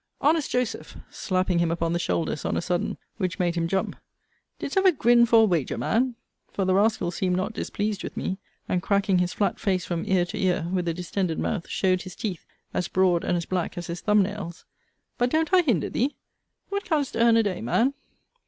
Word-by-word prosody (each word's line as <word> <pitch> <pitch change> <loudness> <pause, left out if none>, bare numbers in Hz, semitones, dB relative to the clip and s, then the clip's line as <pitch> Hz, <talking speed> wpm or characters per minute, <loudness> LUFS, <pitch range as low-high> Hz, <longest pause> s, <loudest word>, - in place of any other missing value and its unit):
Honest 310 0 +2
Joseph, 250 -1 -2
slapping 185 -2 0
him 170 -1 +2
upon 165 0 -1
the 170 - 0
shoulders 165 -3 -1
on - - -1
a - - 0
sudden, 175 0 -1 0.2
which 185 -4 -2
made 175 -2 +1
him 170 -1 -1
jump, 190 +2 -1 0.6
didst 275 - -5
ever 385 -1 +5
grin 240 -5 +4
for 230 -1 +6
a - - +6
wager, 170 -9 0
man? 245 +2 +1 0.4
for 195 - -1
the 185 - +2
rascal 200 -3 +2
seemed 180 +1 0
not 190 +4 -2
displeased 210 -2 -3
with - - -7
me; 190 +1 -2 0.3
and, 180 - 0
cracking 200 -1 +2
his 180 0 +1
flat 205 - -1
face 185 -4 0
from 170 -1 -2
ear 185 -2 +3
to - - -6
ear, 180 -3 +1
with 180 -2 0
a 165 - +1
distended 180 -1 -2
mouth, 195 -7 -2
showed 185 -1 +1
his 185 -2 -9
teeth, 190 -7 -5 0.3
as 180 - -1
broad 180 -2 +2
and 175 - +1
as 170 - -3
black 180 -2 -2
as 175 - -4
his 170 +1 -5
thumb 210 -1 +4
nails. 190 -4 -6 0.5
But 245 +1 +3
don't 320 +5 0
I 370 - +7
hinder 240 - 0
thee? 265 +5 0 0.5
What 400 0 -2
canst 295 -4 -1
earn 230 0 +5
a 225 - +4
day, 200 -4 -2
man? 230 - +2
190 Hz, 210 wpm, -25 LUFS, 175-225 Hz, 0.6 s, I